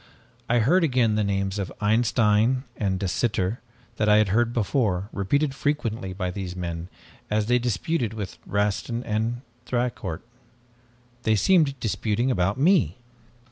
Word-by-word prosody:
I 120 - +3
heard 160 +11 +4
again 125 -7 +2
the 105 0 +1
names 100 0 -1
of 95 - -3
Einstein 110 +2 +2
and 95 -3 -1
De 95 - -1
Sitter 105 +1 -1 0.4
that 105 - +2
I 105 - +6
had 105 -2 +3
heard 115 +4 +2
before, 105 -4 0
repeated 135 +9 0
frequently 115 -9 -2
by 95 -1 -3
these 90 -2 -5
men 85 -1 -5 0.4
as 105 0 +1
they 125 +2 +3
disputed 120 - -1
with 105 -3 -6
Rastin 105 +4 -1
and 115 +3 -1 0.3
Thicourt. 120 -9 -2 1.0
They 110 -2 +2
seemed 145 - +3
disputing 115 +3 0
about 95 0 +1
me. 140 - +3
110 Hz, 140 wpm, -25 LUFS, 100-120 Hz, 1.0 s, I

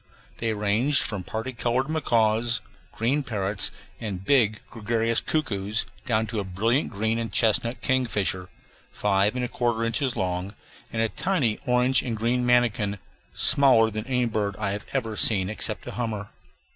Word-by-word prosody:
They 115 -1 0
ranged 110 +7 +3
from 105 -3 -2
party 110 +7 -5
colored 120 +2 0
macaws, 115 -6 +2 0.3
green 130 +7 0
parrots, 100 -6 -1 0.3
and 95 -4 -5
big 110 -6 +3
gregarious 115 +1 0
cuckoos 105 -7 -1 0.2
down 110 -2 +2
to 110 0 -4
a - - -1
brilliant 110 +9 0
green 110 +2 -1
and 115 -3 -4
chestnut 115 +3 +1
kingfisher, 105 -8 0 0.4
five 100 +2 +1
and 125 -1 -1
a - - -2
quarter 120 -2 -1
inches 115 +3 0
long, 90 +2 -3 0.4
and 115 0 0
a 115 - 0
tiny 135 - 0
orange 125 +1 +3
and 115 -4 -3
green 120 +3 0
manakin, 120 -4 +2 0.4
smaller 125 -5 +5
than 110 +2 -5
any 125 -2 +1
bird 105 -3 -1
I 105 -2 -1
have 100 +1 -5
ever 115 -5 -2
seen 100 -3 +2
except 110 - -2
a - - -6
hummer. 110 -3 -4
115 Hz, 160 wpm, -25 LUFS, 105-125 Hz, 0.4 s, smaller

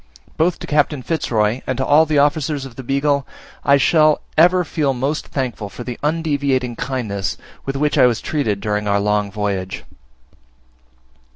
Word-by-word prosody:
Both 170 +2 +1
to - - -7
Captain 150 -2 +1
Fitz 160 +1 -2
Roy 110 +2 +1
and 130 - -1
to 130 - 0
all 155 +2 +5
the 150 -1 +1
Officers 145 0 +1
of 130 -3 -11
the 130 - -7
Beagle 140 +2 0 0.4
I 140 0 +5
shall 155 +3 +4
ever 180 +3 +5
feel 145 -5 0
most 135 +5 -2
thankful 120 -6 -3
for 120 - -8
the 120 -1 -6
undeviating 145 -5 0
kindness 110 -7 -3 0.3
with 135 - -2
which 150 +1 +1
I 125 - +7
was 120 -2 0
treated 110 -10 -2
during 105 -1 -1
our 100 0 +2
long 105 0 0
voyage. 100 -2 -3
135 Hz, 170 wpm, -19 LUFS, 110-150 Hz, 0.4 s, I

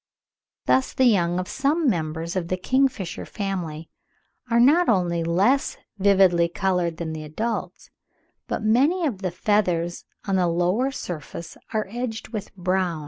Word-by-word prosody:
Thus 260 - +2
the 260 - +3
young 175 -7 +3
of 185 0 -2
some 290 +4 0
members 165 -4 -1
of 180 -3 -1
the 185 - -1
kingfisher 255 -3 0
family 175 -6 -4 0.6
are 235 0 +3
not 305 +9 +5
only 175 -5 +1
less 195 +12 +2 0.2
vividly 190 -3 +4
coloured 180 -3 0
than 160 -2 -4
the 155 -1 -6
adults, 220 +10 -4 0.6
but - - -3
many 280 +11 +3
of 235 -11 -2
the 185 - -1
feathers 175 -2 0 0.2
on 195 -1 +2
the 180 -1 +2
lower 180 +10 +1
surface 170 - -7 0.2
are 215 -1 0
edged 225 0 -5
with 215 -3 -6
brown 185 0 0
(27. 160 - -6
190 Hz, 150 wpm, -24 LUFS, 170-235 Hz, 0.6 s, not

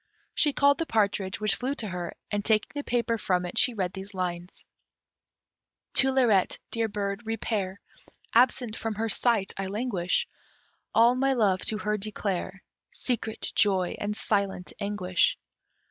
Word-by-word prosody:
She 295 - +3
called 280 +2 +3
the 330 - -1
partridge, 200 -2 0
which 215 0 +4
flew 265 +3 -2
to 225 - -2
her, 180 -2 -5 0.2
and 205 -1 -1
taking 215 0 +2
the 290 -1 -4
paper 235 -2 0
from 180 -3 0
it, 175 - 0
she 245 - +4
read 185 -3 -2
these 195 +1 -8
lines: 180 -1 -4 1.3
To 265 - +5
Lirette, 235 -8 +3
dear 230 -1 0
bird, 200 +1 -4
repair 205 -3 -2 0.5
Absent 245 -1 +3
from 225 -1 -3
her 225 +2 -1
sight 220 -2 +2
I 195 - -2
languish, 200 -4 -1 0.7
All 235 +2 +6
my 270 +1 +2
love 200 -7 +2
to 215 - +2
her 210 +2 -1
declare 195 -2 -3 0.3
Secret 225 -3 -2
joy 190 -3 +2
and 210 0 -2
silent 200 -4 -1
anguish. 205 - +1
210 Hz, 150 wpm, -27 LUFS, 190-235 Hz, 1.3 s, All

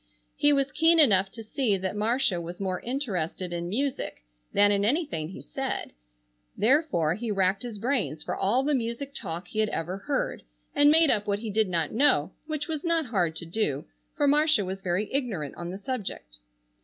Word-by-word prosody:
He 290 - +4
was 275 -1 +2
keen 330 +1 +4
enough 195 -11 +5
to 225 +3 -9
see 215 -2 0
that 190 +1 -3
Marcia 215 -4 +1
was 170 +1 -7
more 185 -2 -2
interested 190 - -3
in 170 0 -3
music 255 - -2 0.3
than 205 0 +5
in 200 0 +2
anything 235 - 0
he 185 - -9
said, - - -4 0.6
therefore 215 - +3
he 220 +5 -4
racked 195 -1 +1
his 235 -4 -6
brains 205 - -1
for - - -3
all 235 +7 +1
the 295 +2 +1
music 250 +2 -2
talk 175 -7 -5
he 215 - -4
had 215 -1 +2
ever 175 +2 -3
heard, 275 +7 -2 0.3
and 290 0 +5
made 320 0 +6
up 210 -1 0
what 200 -1 +1
he 215 0 -5
did 215 -1 +2
not 165 -4 0
know, 220 - +3 0.2
which 305 -2 -3
was 315 -3 -3
not 335 -2 +1
hard 180 -9 0
to 170 - -5
do, 165 -6 -1 0.3
for 290 - +3
Marcia 295 -6 +4
was 190 +1 -5
very 185 +3 0
ignorant 205 - -2
on 175 0 -6
the 185 - -5
subject. 195 - -5
210 Hz, 190 wpm, -27 LUFS, 180-275 Hz, 0.6 s, made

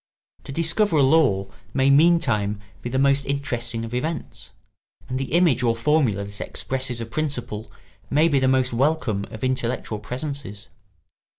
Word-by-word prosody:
To - - -7
discover 165 +5 +1
a 140 - +5
law 130 -10 +3 0.2
may 135 0 +4
meantime 140 -10 +3 0.2
be 120 - -4
the 130 - -1
most 140 +1 +3
interesting 120 -5 -2
of 115 - -8
events, 155 +6 -4 0.6
and 130 +1 -3
the 135 - -4
image 170 -8 +4
or 115 -2 +2
formula 115 -5 +2
that 100 0 -9
expresses 130 -2 -3
a 115 - -3
principle 120 -5 -4 0.4
may 150 +4 +4
be 145 -4 +3
the 130 - +2
most 130 -1 +2
welcome 125 -6 +1
of 110 - -9
intellectual 125 -4 -1
presences. 125 -2 -6
130 Hz, 155 wpm, -23 LUFS, 115-145 Hz, 0.6 s, a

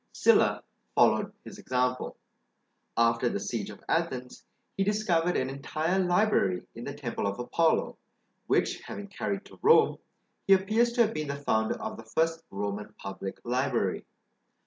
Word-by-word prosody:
Sylla - - +4 0.3
followed - - +4
his - - -10
example. 125 0 -1 0.8
Alter 115 0 +3
the - - -2
siege - - -3
of - - -11
Athens, 125 -1 -2 0.3
he 195 - +1
discovered 180 -4 +1
an 130 - 0
entire 155 +6 -1
library 180 - +2
in 115 - -8
the 140 - -4
temple 125 -7 -3
of 100 - -2
Apollo, 160 +6 +1 0.5
which - - +1
having 205 - -7
carried 200 0 -3
to - - -15
Rome, 455 +3 +5 0.5
he 195 - +8
appears 215 +5 +3
to 240 - +3
have 220 0 -1
been 155 -1 -3
the 140 - -2
founder 110 -6 0
of - - -5
the 115 - -9
first 160 +8 0
Roman 100 +1 -4
public 95 0 -6
library. 125 -5 0
140 Hz, 150 wpm, -29 LUFS, 115-190 Hz, 0.8 s, he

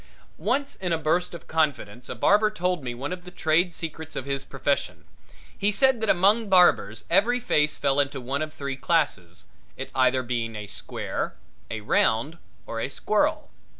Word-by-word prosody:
Once 280 +2 0
in 180 -2 -3
a 165 - +2
burst 170 +3 0
of 170 - -11
confidence 140 -8 -1
a - - -4
barber 210 +1 +4
told 180 -6 -1
me 120 -1 -4
one 135 +8 -4
of 180 -1 -8
the 180 - -10
trade 170 +1 +1
secrets 160 -1 -6
of 130 - -4
his 140 -1 -2
profession 140 +1 -2 0.5
he 205 +1 +1
said 255 +3 +3
that 220 - 0
among 205 +4 +3
barbers 175 - +4
every 230 +8 +4
face 150 -12 +1
fell 140 0 +1
into 140 -1 0
one 135 +3 -3
of 155 0 -3
three 140 -3 -5
classes, 135 - -1 0.3
it - - -7 0.3
being 115 -2 -2
either - - -5
a 105 - -6
square, 100 - -4 0.3
a 110 - -4
round 115 +9 +1 0.3
or 115 - -5
a 115 - -2
squirrel. 255 - 0
155 Hz, 180 wpm, -25 LUFS, 135-185 Hz, 0.5 s, barber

